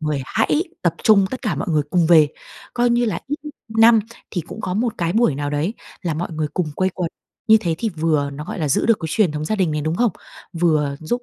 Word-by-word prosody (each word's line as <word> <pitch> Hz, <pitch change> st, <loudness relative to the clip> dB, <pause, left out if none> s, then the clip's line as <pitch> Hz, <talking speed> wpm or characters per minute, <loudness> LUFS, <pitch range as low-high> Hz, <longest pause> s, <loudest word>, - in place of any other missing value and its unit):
người 150 Hz, -3 st, -1 dB
hãy 225 Hz, -, +1 dB, 0.2 s
tập 170 Hz, -2 st, +1 dB
trung 200 Hz, -3 st, +5 dB
tất 260 Hz, -, -6 dB
cả 215 Hz, -9 st, 0 dB
mọi 145 Hz, -, -4 dB
người 150 Hz, -2 st, +2 dB
cùng 175 Hz, -3 st, +3 dB
về. 160 Hz, -3 st, +6 dB, 0.5 s
Coi 240 Hz, 0 st, +2 dB
như 240 Hz, 0 st, +2 dB
là 220 Hz, -, -2 dB
ít 290 Hz, +2 st, -2 dB
nhất 300 Hz, -, -7 dB, 0.3 s
năm 225 Hz, 0 st, +7 dB, 0.3 s
thì 180 Hz, -, -2 dB
cũng 175 Hz, +7 st, -9 dB
có 180 Hz, -, -3 dB
một 230 Hz, +1 st, 0 dB
cái 170 Hz, 0 st, 0 dB
buổi 225 Hz, -, +3 dB
nào 145 Hz, 0 st, -3 dB
đấy 155 Hz, +9 st, -1 dB, 0.3 s
là 170 Hz, -4 st, -1 dB
mọi 170 Hz, +2 st, -4 dB
người 155 Hz, -1 st, -2 dB
cùng 160 Hz, -5 st, -1 dB
quây 185 Hz, 0 st, +1 dB
quần. 175 Hz, -2 st, -2 dB, 0.4 s
Như 220 Hz, -, +8 dB
thế 165 Hz, -3 st, -1 dB
thì 225 Hz, -, -1 dB
vừa 155 Hz, -5 st, 0 dB
nó, 145 Hz, +2 st, -7 dB
gọi 180 Hz, -, -6 dB
là, 155 Hz, -, -1 dB
giữ 140 Hz, -, +1 dB
được 230 Hz, -2 st, +4 dB
cái 160 Hz, -, -3 dB
truyền 200 Hz, -9 st, +2 dB
thống 150 Hz, 0 st, -3 dB
gia 215 Hz, +6 st, -1 dB
đình 185 Hz, -5 st, +1 dB
này, 150 Hz, -, -1 dB
đúng 155 Hz, +2 st, -1 dB
không? 240 Hz, -3 st, +2 dB, 0.4 s
Vừa 155 Hz, -4 st, +1 dB
giúp 240 Hz, +10 st, -2 dB
170 Hz, 260 wpm, -21 LUFS, 155-220 Hz, 0.5 s, Như